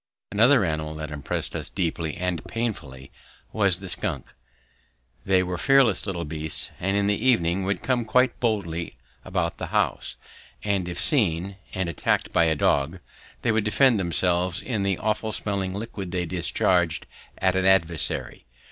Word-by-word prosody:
Another 115 Hz, +2 st, +5 dB
animal 80 Hz, -1 st, -3 dB
that 75 Hz, 0 st, -6 dB
impressed 75 Hz, -2 st, -3 dB
us -, -, -4 dB
deeply 85 Hz, -4 st, -2 dB
and 90 Hz, -3 st, -2 dB
painfully 70 Hz, -, -4 dB, 0.4 s
was 100 Hz, -5 st, +3 dB
the 95 Hz, +1 st, -9 dB
skunk. 90 Hz, -, -3 dB, 0.9 s
They 95 Hz, -1 st, +3 dB
were 90 Hz, -1 st, -4 dB
fearless 130 Hz, -7 st, +4 dB
little 85 Hz, -3 st, -3 dB
beasts 80 Hz, 0 st, -1 dB
and 95 Hz, +2 st, 0 dB
in 100 Hz, -, +2 dB
the 105 Hz, +2 st, 0 dB
evening 95 Hz, -7 st, +2 dB
would 100 Hz, +1 st, -2 dB
come 125 Hz, -2 st, +1 dB
quite 125 Hz, +2 st, +2 dB
boldly 90 Hz, -8 st, -2 dB, 0.3 s
about 90 Hz, -3 st, -2 dB
the -, -, -4 dB
house, -, -, -1 dB, 0.5 s
and 100 Hz, -4 st, 0 dB
if 85 Hz, -, -5 dB
seen 95 Hz, -, +1 dB, 0.2 s
and 95 Hz, -2 st, -1 dB
attacked 85 Hz, -4 st, -1 dB
by 85 Hz, -, +4 dB
a 80 Hz, -1 st, +2 dB
dog, 75 Hz, +3 st, +1 dB, 0.5 s
they -, -, +2 dB
would 110 Hz, -1 st, +1 dB
defend 110 Hz, +2 st, +4 dB
themselves 90 Hz, 0 st, 0 dB
with 115 Hz, -6 st, -2 dB
the 100 Hz, -2 st, +1 dB
awful 110 Hz, 0 st, -1 dB
smelling 100 Hz, -3 st, -1 dB
liquid 100 Hz, -3 st, -5 dB
they 90 Hz, -1 st, -2 dB
discharge 85 Hz, -1 st, +1 dB, 0.3 s
at 95 Hz, -1 st, +1 dB
an 95 Hz, 0 st, +1 dB
adversary. 85 Hz, -9 st, +2 dB
95 Hz, 155 wpm, -25 LUFS, 85-105 Hz, 0.9 s, Another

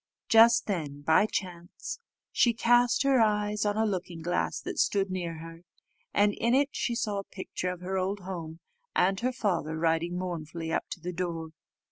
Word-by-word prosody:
Just 225 Hz, +1 st, +6 dB
then, 150 Hz, -8 st, -3 dB
by 160 Hz, +8 st, +4 dB
chance, 180 Hz, -, -5 dB, 0.3 s
she 235 Hz, -, +3 dB
cast 240 Hz, +2 st, +3 dB
her 270 Hz, -3 st, +4 dB
eyes 210 Hz, -1 st, +1 dB
on 205 Hz, 0 st, 0 dB
a 220 Hz, -, +2 dB
looking 180 Hz, -5 st, -3 dB
glass 175 Hz, +1 st, -1 dB
that -, -, -5 dB
stood 195 Hz, -2 st, +2 dB
near 175 Hz, -3 st, -3 dB
her, 165 Hz, +1 st, -10 dB, 0.5 s
and 205 Hz, 0 st, +3 dB
in 235 Hz, +4 st, +1 dB
it 280 Hz, +1 st, +3 dB
she 240 Hz, -, -2 dB
saw 210 Hz, -3 st, -1 dB
a -, -, -5 dB
picture 185 Hz, -1 st, -4 dB
of 180 Hz, -1 st, -5 dB
her 190 Hz, +1 st, -2 dB
old 195 Hz, +2 st, -2 dB
home, 170 Hz, -3 st, -7 dB, 0.3 s
and 190 Hz, +1 st, +3 dB
her 255 Hz, +2 st, 0 dB
father 175 Hz, -10 st, -1 dB
riding 165 Hz, +2 st, 0 dB
mournfully 165 Hz, -2 st, -4 dB
up -, -, -1 dB
to -, -, -6 dB
the 180 Hz, +2 st, -5 dB
door. 170 Hz, -2 st, -3 dB
185 Hz, 180 wpm, -29 LUFS, 170-210 Hz, 0.5 s, Just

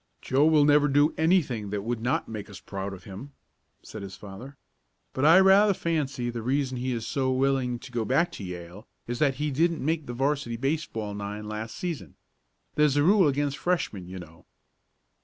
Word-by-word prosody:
"Joe 140 Hz, +4 st, +2 dB
will 155 Hz, -2 st, +5 dB
never 145 Hz, 0 st, +5 dB
do 145 Hz, +2 st, +3 dB
anything 155 Hz, -, +1 dB
that 100 Hz, 0 st, -3 dB
would 115 Hz, 0 st, -3 dB
not 125 Hz, +3 st, 0 dB
make 110 Hz, -3 st, -7 dB
us 100 Hz, -2 st, -10 dB
proud 100 Hz, 0 st, -5 dB
of 95 Hz, -2 st, -10 dB
him," 105 Hz, +10 st, -9 dB, 0.5 s
said 110 Hz, -, -9 dB
his 95 Hz, -1 st, -8 dB
father. 110 Hz, +8 st, -10 dB, 0.6 s
"But 130 Hz, -, 0 dB
I 165 Hz, +4 st, +8 dB
rather 195 Hz, +1 st, +6 dB
fancy 140 Hz, -8 st, -2 dB
the 120 Hz, -1 st, -5 dB
reason 130 Hz, +2 st, 0 dB
he 130 Hz, +1 st, -2 dB
is 115 Hz, -2 st, -3 dB
so 135 Hz, -3 st, 0 dB
willing 130 Hz, -2 st, +1 dB
to 125 Hz, -, -12 dB
go 120 Hz, -2 st, -1 dB
back 165 Hz, +9 st, +1 dB
to 110 Hz, -, -8 dB
Yale 90 Hz, +3 st, -8 dB, 0.2 s
is 120 Hz, 0 st, -4 dB
that 140 Hz, -3 st, +2 dB
he 150 Hz, +1 st, -2 dB
didn't 165 Hz, +1 st, +1 dB
make 160 Hz, -1 st, -1 dB
the 120 Hz, -, -4 dB
'varsity 135 Hz, -2 st, -1 dB
baseball 130 Hz, -6 st, -2 dB
nine 105 Hz, +1 st, -5 dB
last 110 Hz, +1 st, -5 dB
season. 150 Hz, -, -5 dB, 0.6 s
There's 150 Hz, -2 st, +3 dB
a 145 Hz, -, +4 dB
rule 190 Hz, 0 st, +5 dB
against 145 Hz, 0 st, -1 dB
Freshmen, 110 Hz, -, -1 dB
you 95 Hz, +1 st, -8 dB
know." 85 Hz, 0 st, -13 dB
130 Hz, 195 wpm, -27 LUFS, 105-150 Hz, 0.6 s, I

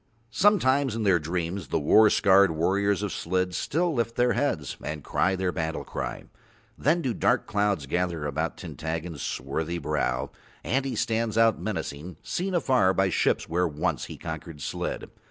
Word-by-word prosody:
Sometimes 140 Hz, -, +3 dB
in 115 Hz, -, -2 dB
their 95 Hz, -4 st, +4 dB
dreams 85 Hz, +2 st, -3 dB
the -, -, 0 dB
war 105 Hz, +9 st, +6 dB
scarred 100 Hz, -1 st, +5 dB
warriors 100 Hz, +5 st, +1 dB
of 105 Hz, -, -2 dB
Slid 90 Hz, +1 st, -1 dB
still 170 Hz, -, 0 dB
lift 115 Hz, -3 st, -1 dB
their 125 Hz, 0 st, +3 dB
heads 80 Hz, -, -1 dB
and 75 Hz, -1 st, -5 dB
cry 95 Hz, -, +1 dB
their 95 Hz, -1 st, -1 dB
battle 80 Hz, -2 st, -3 dB
cry; -, -, -5 dB, 0.5 s
then 165 Hz, +4 st, +1 dB
do 125 Hz, -, 0 dB
dark -, -, +1 dB
clouds 100 Hz, -7 st, 0 dB
gather 85 Hz, 0 st, -1 dB
about 75 Hz, +3 st, -2 dB
Tintaggon's 80 Hz, -1 st, -5 dB
swarthy 80 Hz, +6 st, -3 dB
brow 75 Hz, -5 st, -1 dB, 0.3 s
and 135 Hz, +2 st, 0 dB
he 130 Hz, -3 st, -2 dB
stands 115 Hz, 0 st, 0 dB
out 115 Hz, -5 st, +4 dB
menacing, 90 Hz, -5 st, -4 dB
seen 185 Hz, +1 st, -2 dB
afar 130 Hz, -, +3 dB
by 95 Hz, -1 st, +2 dB
ships, -, -, +1 dB
where 90 Hz, +2 st, +1 dB
once 75 Hz, -2 st, -2 dB
he -, -, -9 dB
conquered 80 Hz, -1 st, -7 dB
Slid. -, -, -4 dB
95 Hz, 165 wpm, -26 LUFS, 80-115 Hz, 0.5 s, war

